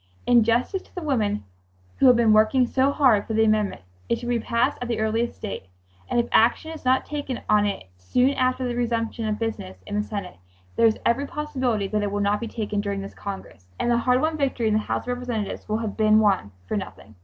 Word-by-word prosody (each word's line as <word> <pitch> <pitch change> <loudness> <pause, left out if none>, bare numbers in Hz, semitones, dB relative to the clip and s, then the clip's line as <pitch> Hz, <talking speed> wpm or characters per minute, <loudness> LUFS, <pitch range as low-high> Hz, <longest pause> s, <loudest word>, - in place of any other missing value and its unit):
"In 240 -2 +5
justice 240 - +1
to - - -24
the 360 - -5
women 215 -8 0 0.5
who 270 - +5
have 250 - +7
been 230 -2 +4
working 220 +4 +4
so 265 +3 +2
hard 255 -8 +3
for 220 - -2
the 220 - +4
amendment 215 - +1 0.3
it 235 - +2
should 240 +1 -6
be 240 -1 +1
passed 235 +1 0
at 245 - -3
the 235 - -1
earliest 225 +2 -1
date, 195 - -5 0.4
and - - +1
if 235 - 0
action 240 +8 +3
is 320 - -9
not 260 0 +2
taken 285 -4 -4
on 210 -1 +4
it 200 - -3
soon 250 - +2
after 255 -1 0
the 245 - -2
resumption 230 -2 -1
of 210 -1 -1
business 95 - -5
in - - -8
the 210 - +1
Senate 205 - -6 0.4
there 230 - +5
is 220 - +1
every 275 +5 +1
possibility 260 -9 -2
that 210 +1 -1
it 205 -1 -2
will 205 - -1
not 205 +1 +1
be 235 - -4
taken 210 -2 -3
during 200 -1 -3
this 195 - -8
Congress, 190 - -8
and 240 - +1
the 235 - +3
hard 250 +1 +2
won 315 0 0
victory 270 -5 -1
in 215 - +2
the 215 - +3
House 215 - -3
of - - -8
Representatives 245 -6 -4
will 215 - +1
have 220 -3 -4
been 215 -1 +4
won 195 - +2 0.2
for - - -2
nothing." 110 - -7
230 Hz, 235 wpm, -24 LUFS, 210-250 Hz, 0.5 s, have